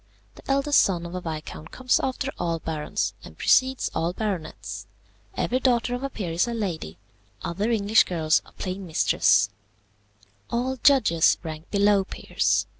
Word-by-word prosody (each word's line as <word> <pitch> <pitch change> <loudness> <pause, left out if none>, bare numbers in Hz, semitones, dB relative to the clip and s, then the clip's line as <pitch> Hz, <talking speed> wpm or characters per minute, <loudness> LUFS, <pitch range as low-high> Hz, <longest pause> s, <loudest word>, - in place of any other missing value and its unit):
The - - -15
eldest 275 +1 +4
son 175 -3 0
of 170 - -7
a 180 - -4
viscount 155 -1 -6
comes 255 -1 +1
after 265 +1 -2
all 170 -1 0
barons, 155 -2 -2
and - - -12
precedes 260 0 +3
all 165 +2 -1
baronets. 190 -7 -4 0.5
Every 255 - 0
daughter 245 -2 +2
of 245 - -3
a 275 - -2
peer 195 -9 -5
is 170 +7 +1
a 235 - -3
Lady. 170 - -4 0.5
Other 200 +6 -1
English 220 -1 +4
girls 160 -3 +1
are - - -19
plain 185 0 -5
Mistress. 100 - +3 1.0
"All 255 +3 -1
judges 225 - +4
rank 155 0 -7
below 200 -1 +3
peers. - - 0
195 Hz, 155 wpm, -25 LUFS, 165-245 Hz, 1.0 s, eldest